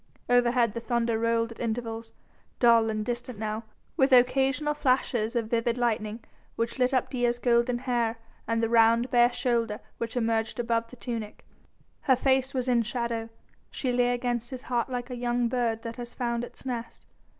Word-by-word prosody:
Overhead 245 -2 +3
the 235 - -3
thunder 230 -1 0
rolled 230 0 +1
at 230 - -11
intervals, 225 -1 -3 0.5
dull 230 -2 +5
and 215 -1 -2
distant 240 0 -4
now, 215 +1 -3 0.3
with 265 0 +3
occasional 265 +4 +4
flashes 255 -5 0
of 230 -2 -1
vivid 235 0 +1
lightning 225 -2 -1 0.3
which 230 +3 -2
lit 250 0 +3
up 255 -2 0
Dea's 245 -2 +1
golden 240 0 +2
hair 240 -2 -1 0.3
and 230 0 0
the - - +3
round, 230 +2 +4
bare 240 0 +5
shoulder 235 -4 0 0.2
which 230 +1 -3
emerged 225 -1 0
above 230 -1 0
the 250 - -12
tunic. 230 -3 -6 0.5
Her 260 - +3
face 265 +1 +2
was 255 -2 -1
in 245 -2 +3
shadow; 230 0 -3 0.4
she 255 -3 -2
lay 245 0 +3
against 240 -1 -2
his 255 -2 -7
heart 240 -1 -1
like 250 0 -4
a - - -3
young 240 0 0
bird 235 -2 -1
that 230 0 -6
has 240 -1 -8
found 235 -1 -1
its 245 - -9
nest. 235 -3 -5
240 Hz, 175 wpm, -27 LUFS, 230-245 Hz, 0.5 s, dull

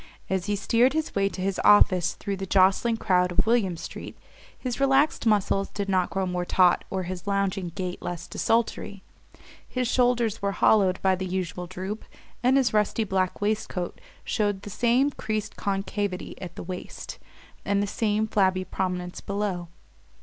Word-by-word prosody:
As 190 0 0
he 205 - +1
steered 235 +6 +3
his 315 0 -2
way 195 0 +2
to 185 - -7
his 195 -1 -1
office 185 -4 +5
through 200 -2 -4
the 195 0 -5
jostling 195 +5 +3
crowd 180 -4 +2
of 175 - +2
William 220 -7 +2
Street - - -8 0.4
his 250 -1 -4
relaxed 275 -1 +3
muscles 200 -2 +2
did 200 -1 -4
not 185 -2 +1
grow 190 -1 -1
more 180 -1 -2
taut 180 0 +3
or 190 -1 -2
his 180 +2 -6
lounging 200 -2 0
gait 185 -2 -4
less 175 -2 -5
desultory. 225 -3 -1 0.6
His 255 -1 -1
shoulders 240 -3 +2
were 200 0 0
hollowed 195 -4 +3
by 190 -1 +4
the 185 0 -4
usual 180 -1 -3
droop, 185 +4 -5 0.4
and 255 +3 +4
his 255 -5 +2
rusty 210 +1 +2
black 190 -2 -1
waistcoat 205 -4 -2 0.2
showed 205 -3 -1
the 205 - -7
same 245 +7 +2
creased 215 -4 -3
concavity 195 -1 -2
at 180 - -7
the - - -7
waist, 180 +1 -7 0.4
the 200 0 +1
same 210 +1 0
flabby 190 -3 +1
prominence 180 -2 -3
below. 200 -3 -2
200 Hz, 165 wpm, -26 LUFS, 185-215 Hz, 0.6 s, office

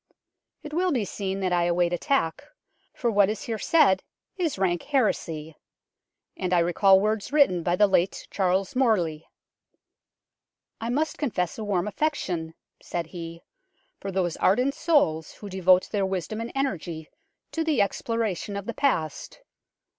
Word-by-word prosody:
It 300 - -8
will 360 +2 +1
be 240 -8 0
seen 195 0 -4
that 185 -1 0
I 175 -1 +2
await 175 0 +1
attack, 175 - 0 0.5
for 240 -2 -1
what 200 -2 +4
is 215 - -3
here 225 -2 -3
said 280 - +4 0.3
is 335 - -1
rank 175 -3 +1
heresy; 165 - -1 0.8
and 180 -1 0
I - - +4
recall 185 +3 +5
words 215 +3 -1
written 280 - +4
by 175 +1 +1
the 205 - +5
late 190 -2 0
Charles 190 +3 0
Morley. 180 -12 +1 0.8
" - - -38
I 230 - -3
must 295 +5 -1
confess 210 - -2
a - - -3
warm 200 -2 0
affection 185 - -2 0.3
(said 170 -1 -3
he) 170 0 -8 0.6
for 195 - -5
those 180 -3 -1
ardent 250 +8 +2
souls 160 - +1
who 205 - -10
devote 185 -1 +3
their 200 -3 0
wisdom 190 +4 -3
and 230 - -5
energy 175 - -3 0.4
to 325 - -1
the 315 -5 +1
exploration 205 -1 -1
of 200 -1 -4
the 235 - -4
past. 180 - -1
195 Hz, 155 wpm, -26 LUFS, 175-240 Hz, 0.8 s, recall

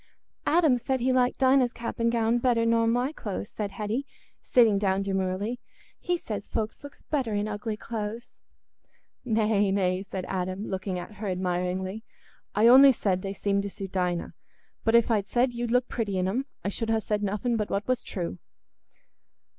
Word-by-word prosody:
"Adam 315 -6 +4
said 260 +2 -1
he 255 +2 +1
liked 250 -1 +2
Dinah's 260 -2 +4
cap 235 -1 -6
and 230 0 +2
gown 230 0 +2
better 235 -2 +2
nor 230 0 +3
my 245 +4 +1
clothes," 205 -8 -5
said 205 -2 -4
Hetty, 220 +6 -3 0.3
sitting 225 -5 +4
down 195 -1 +1
demurely. 195 +4 -2 0.4
"He 355 0 0
says 210 -10 -6
folks 220 +4 -3
looks 285 0 -12
better 255 -8 -1
in 205 +1 0
ugly 210 +1 -4
clothes." 225 +1 -6 0.8
"Nay, 215 -3 +2
nay," 185 -1 +1
said 190 -2 -5
Adam, 185 +2 -3
looking 190 -1 -3
at 200 +3 -8
her 210 0 -4
admiringly; 185 +2 -2 0.5
"I 215 - +4
only 265 +3 +9
said 190 -5 0
they 195 0 -4
seemed 200 0 0
to 200 - -4
suit 195 -1 -7
Dinah. 180 -2 -1 0.5
But 225 +1 +3
if 235 0 +4
I'd 205 -3 +1
said 245 +1 +1
you'd 240 0 -3
look 250 +1 +2
pretty 210 -5 -2
in 185 0 +1
'em, 255 +8 -1 0.2
I - - +1
should 225 +2 -3
ha' 225 - +3
said 210 -1 -1
nothing 210 +4 -1
but 210 -2 -1
what 200 +1 -2
was 255 -1 +1
true." 170 - -4
215 Hz, 180 wpm, -27 LUFS, 195-240 Hz, 0.8 s, only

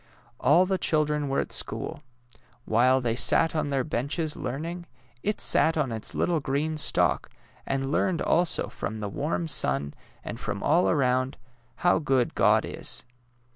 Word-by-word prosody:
All 170 +5 +4
the 190 0 -1
children 150 -3 0
were 135 - 0
at - - -7
school. - - -3 0.7
AVhile 125 +4 +3
they 115 -1 0
sat 165 +6 +2
on 155 -2 -1
their 135 -2 0
benches 150 +4 -1
learning, 165 +7 -5 0.3
it 210 +1 -2
sat 160 0 +3
on 140 -5 0
its 110 -1 -4
little 170 -2 +1
green 150 +3 -2
stalk, 90 - +1 0.4
and 135 0 -1
learned 170 +2 +1
also 175 0 +2
from 110 +1 -6
the 105 -1 -4
warm 155 - -2
sim, 70 - +2 0.3
and 115 - -6
from 100 -1 -4
all 165 +5 +3
around, 130 -3 +1 0.4
how 175 -2 +2
good 135 -5 +1
God - - +3
is. - - -5
145 Hz, 155 wpm, -26 LUFS, 125-160 Hz, 0.7 s, All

